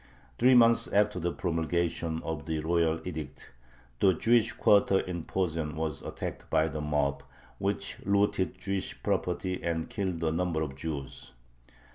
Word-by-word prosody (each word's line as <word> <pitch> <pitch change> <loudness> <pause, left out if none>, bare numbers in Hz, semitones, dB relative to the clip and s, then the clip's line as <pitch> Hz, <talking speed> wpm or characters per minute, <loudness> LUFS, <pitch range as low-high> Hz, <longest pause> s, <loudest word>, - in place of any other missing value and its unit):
Three 125 +2 +6
months 115 -1 +5
after 105 -1 +2
the 85 0 -1
promulgation 85 -1 -1
of 80 -2 -4
the 80 -1 -1
royal 80 0 +1
edict 75 -5 -7 0.5
the 95 - +5
Jewish 115 +3 +3
quarter 100 -3 +4
in 85 -3 -4
Posen 80 -5 -2
was 80 -3 -3
attacked - - -6
by 80 - +3
the 80 -1 -4
mob, 75 -2 0 0.4
which - - -2
looted 100 -1 +1
Jewish 100 -1 -4
property 90 -1 -1
and 80 -1 -2
killed 95 -5 -2
a 80 - +2
number 85 -1 0
of 70 -3 -5
Jews. 70 -2 -6
85 Hz, 145 wpm, -29 LUFS, 80-95 Hz, 0.5 s, Three